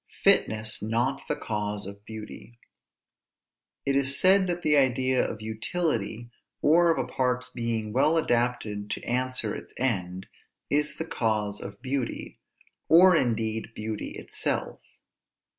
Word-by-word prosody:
FITNESS 110 0 +3
NOT 120 +6 0
THE - - 0
CAUSE 105 -2 -3
OF 100 +1 -10
BEAUTY. 110 +2 -10 1.3
It 135 - +1
is 140 0 +1
said 190 0 +5
that 175 0 -2
the 150 -1 +4
idea 130 -1 +3
of 110 -1 -4
utility, 115 - -2 0.3
or 170 +3 +4
of 165 - +2
a - - 0
part's 125 0 -1
being 115 -3 -3
well 150 +5 +3
adapted 120 -7 0
to - - -4
answer 125 -3 -1
its - - -9
end, 95 -7 -1 0.5
is 150 +1 +1
the 160 - -4
cause 105 -7 -1
of 100 +6 -9
beauty, 130 -2 -3 0.5
or 180 +2 +8
indeed 115 -4 -1
beauty 110 0 -5
itself. - - -3
120 Hz, 130 wpm, -27 LUFS, 110-140 Hz, 1.3 s, or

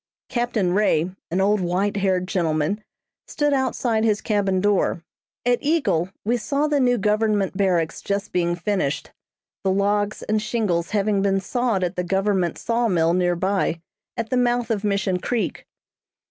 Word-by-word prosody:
Captain 240 -7 0
Ray, 185 -4 +2 0.2
an 180 - -1
old 205 +1 +2
white 185 +3 0
haired 185 -2 +1
gentleman, 170 +2 0 0.4
stood 295 -1 0
outside 245 -4 0
his 215 -2 +2
cabin 200 -4 0
door. 195 -3 +1 0.4
At 245 -1 +3
Eagle 280 - +1 0.2
we 240 +3 +2
saw 280 +6 0
the 300 -1 +1
new 245 -2 +3
government 210 -2 +1
barracks 180 -5 0
just 200 +1 -2
being 175 -1 +1
finished, 175 -5 -2 0.5
the 195 - +1
logs 205 +2 0
and 215 0 0
shingles 210 -7 -1
having 205 -1 +1
been 195 -1 +2
sawed 225 -1 -1
at 180 +1 -2
the 180 - 0
government 190 -1 0
saw 235 0 0
mill 170 -4 +2
near 175 -1 +2
by, 185 -2 0 0.4
at 230 -1 -3
the 255 - +2
mouth 245 -1 +1
of 210 -2 -1
Mission 200 -2 0
Creek. 235 +4 -2
200 Hz, 160 wpm, -23 LUFS, 180-225 Hz, 0.5 s, At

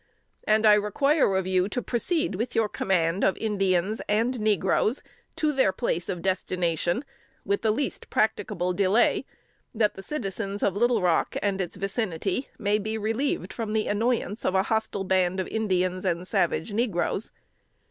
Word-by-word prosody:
And 215 +1 +3
I 210 - +8
require 210 +3 +2
of 190 -1 0
you 185 +1 +1
to 250 - -2
proceed 250 - -1
with 230 +6 -3
your 225 -1 +3
command 180 -2 0
of 190 - +2
Indians 195 -1 0
and 230 +4 +1
negroes 210 - +1 0.3
to 310 -3 +1
their 265 -8 +3
place 185 -4 -2
of 180 -3 -3
destination 180 - -1 0.4
with 200 - 0
the 220 - +1
least 250 +6 -2
practicable 210 -4 0
delay, 200 +5 +2 0.5
that 215 -1 +2
the 195 - -9
citizens 200 -5 -4
of 195 - +1
Little 235 -1 +2
Rock 175 -2 +1
and 195 -1 0
its 175 - -4
vicinity 195 - -2
may 210 -1 +1
be 215 +2 -3
relieved 220 -3 -1
from 220 -2 -4
the 220 -1 +1
annoyance 220 0 -1
of 185 - 0
a 190 - +4
hostile 220 -2 -1
band 185 -1 +1
of 185 - -2
Indians 185 -4 0
and 180 -1 -1
savage 175 +3 0
negroes. 205 -3 0
205 Hz, 160 wpm, -26 LUFS, 185-220 Hz, 0.5 s, I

